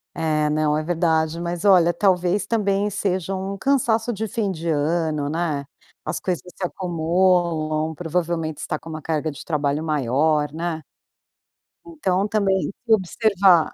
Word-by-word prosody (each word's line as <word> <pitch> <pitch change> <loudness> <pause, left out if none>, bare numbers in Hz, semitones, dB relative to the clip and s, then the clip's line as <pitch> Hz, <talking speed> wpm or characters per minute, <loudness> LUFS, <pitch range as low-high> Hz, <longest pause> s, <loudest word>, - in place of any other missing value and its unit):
É, 155 -2 +1
não 150 0 +1
é 155 - -2
verdade. 165 -1 +1
Mas 170 +1 -3
olha, 175 -4 +6
talvez 180 +1 +2
também 205 -2 +1
seja 195 -2 -1
um 190 +1 -4
cansaço 240 -1 +1
de 220 0 -3
fim 210 -2 -1
de 170 -2 -6
ano, 155 -1 0
né? 155 -3 -2 0.4
As - - -3
coisas 180 -3 -2
se - - -7
acumulam. 170 -3 +1
Provavelmente 165 -1 -2
você - - -5
tá 155 - -2
com 165 - -11
uma 155 -1 -6
carga 155 0 -1
de 140 - -10
trabalho 150 -1 -1
maior, 150 +1 +1
né? 165 0 -3 1.0
Então, 200 - -1
também 200 -3 +1
tem - - -3
que 225 - +4
observar 190 -4 +3
170 Hz, 155 wpm, -22 LUFS, 155-195 Hz, 1.0 s, olha